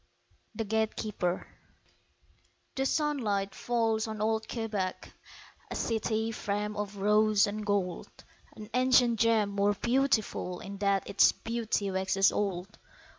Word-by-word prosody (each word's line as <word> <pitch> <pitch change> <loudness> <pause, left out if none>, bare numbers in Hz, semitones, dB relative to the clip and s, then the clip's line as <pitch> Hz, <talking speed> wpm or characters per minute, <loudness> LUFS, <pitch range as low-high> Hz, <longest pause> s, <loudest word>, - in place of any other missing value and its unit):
The 225 - -2
Gatekeeper 215 -4 -1 1.3
THE 270 0 0
sunlight 225 -12 0
falls 225 -1 0
on 220 -1 -5
old 220 +1 0
Quebec, 210 -5 -3 0.6
A - - -5
city 220 0 -1
framed 210 -1 -3
of 205 -1 -4
rose 210 +1 +4
and 210 +1 -4
gold, 200 -4 -1 0.5
An 215 - -9
ancient 250 -2 +4
gem 220 -3 +3
more 200 +1 +1
beautiful 235 -7 0
In 200 -1 -8
that 200 -1 +1
its 200 - +5
beauty 225 -3 -2
waxes 190 +1 +2
old. 195 0 -3
210 Hz, 120 wpm, -30 LUFS, 200-225 Hz, 1.3 s, its